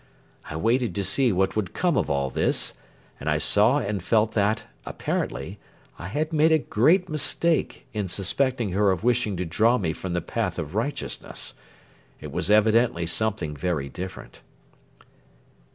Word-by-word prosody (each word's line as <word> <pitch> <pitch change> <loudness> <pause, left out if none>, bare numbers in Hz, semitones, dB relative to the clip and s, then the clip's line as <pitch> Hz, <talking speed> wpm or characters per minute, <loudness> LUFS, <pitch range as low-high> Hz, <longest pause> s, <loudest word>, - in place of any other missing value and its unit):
I - - -5
waited 115 +7 +1
to 100 - -1
see 120 +6 +2
what 95 0 +1
would 105 -4 -2
come 175 -3 +1
of - - 0
all 70 -2 0
this, - - +1 0.5
and 75 - -3
I 75 - +2
saw 105 - +4
and 105 -7 -2
felt 110 +4 +2
that, 105 +1 +1 0.2
apparently, - - -4 0.4
I 90 - -6
had 155 +10 -2
made 155 +1 +4
a 160 - +6
great 160 - +2
mistake 160 +1 0
in 105 -3 -2
suspecting 110 +5 0
her 100 +2 +2
of 95 0 0
wishing 120 -5 +1
to 90 - -2
draw 110 +9 +3
me 85 -7 -1
from 90 +2 -5
the 90 - +1
path - - -3
of 75 +1 -5
righteousness. 120 +8 -3 0.7
It - - -8
was 85 - -2
evidently 110 -4 +3
something 90 -3 0
very 75 -4 -2
different. 95 +4 -8
105 Hz, 160 wpm, -25 LUFS, 90-125 Hz, 0.7 s, a